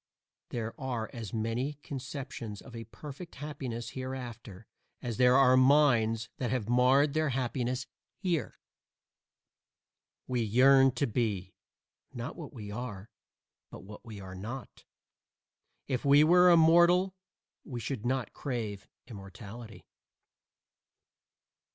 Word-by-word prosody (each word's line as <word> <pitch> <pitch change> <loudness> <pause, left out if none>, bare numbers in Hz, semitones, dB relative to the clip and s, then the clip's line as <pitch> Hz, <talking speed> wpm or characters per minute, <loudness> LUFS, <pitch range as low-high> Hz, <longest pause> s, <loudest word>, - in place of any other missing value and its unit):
There 115 -1 -4
are 120 -4 -3
as 115 -6 -6
many 115 +6 -2
conceptions 130 -5 -6
of 125 -3 -12
a 115 0 -7
perfect 150 - -10
happiness 130 -6 -5
hereafter 120 -6 -7 0.3
as 120 -3 -4
there 125 0 +5
are 130 -1 +6
minds 130 -5 +4
that 125 - -2
have 125 -4 -1
marred 130 +4 +4
their 155 -1 +1
happiness 125 0 -2 0.3
here. 170 - -2 1.7
We 125 -2 -1
yearn 135 +4 +5
to 140 - 0
be, 105 -6 -2 0.6
not 120 -2 -6
what 165 -4 -8
we 105 -6 -8
are, 105 -3 -6 0.6
but - - -11
what 105 +2 -11
we 110 -3 -9
are 95 -1 -9
not. 115 +8 -8 1.0
If 130 -3 -2
we 145 +1 +6
were 180 +3 +6
immortal 175 +3 +5 0.5
we 125 -6 -6
should 120 -1 -4
not 130 0 -1
crave 110 -7 -4 0.2
immortality. 110 +1 -10
125 Hz, 115 wpm, -30 LUFS, 115-140 Hz, 1.7 s, are